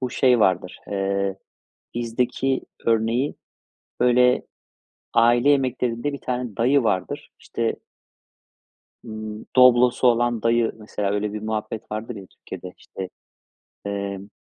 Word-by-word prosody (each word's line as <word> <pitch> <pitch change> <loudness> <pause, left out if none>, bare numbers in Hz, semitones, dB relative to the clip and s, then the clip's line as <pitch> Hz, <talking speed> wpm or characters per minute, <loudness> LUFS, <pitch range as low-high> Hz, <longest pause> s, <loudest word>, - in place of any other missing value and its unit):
bu 125 -2 -2
şey 125 -3 +3
vardır, 90 -2 +1
eee, 100 -1 -1 0.6
bizdeki 125 +3 0 0.3
örneği 115 +4 +1 0.7
böyle 125 0 +4 0.7
aile 120 +4 +5
yemeklerinde 130 -1 +1
bir 140 - -6
tane 125 -4 -3
dayı 130 +3 +3
vardır, 95 -4 -1
işte 115 -1 -2 1.3
ımm, 110 -1 -7
Doblo'su 125 0 +6
olan 120 -1 +2
dayı 115 0 +3
mesela 105 -2 -3
öyle 105 0 -1
bir 105 - -4
muhabbet 110 0 -4
vardır 110 +2 -4
ya 100 - -9
Türkiye'de 90 0 -10
işte, 95 -1 -8 0.8
emm, 100 -1 -4
115 Hz, 110 wpm, -23 LUFS, 105-125 Hz, 1.3 s, Doblo'su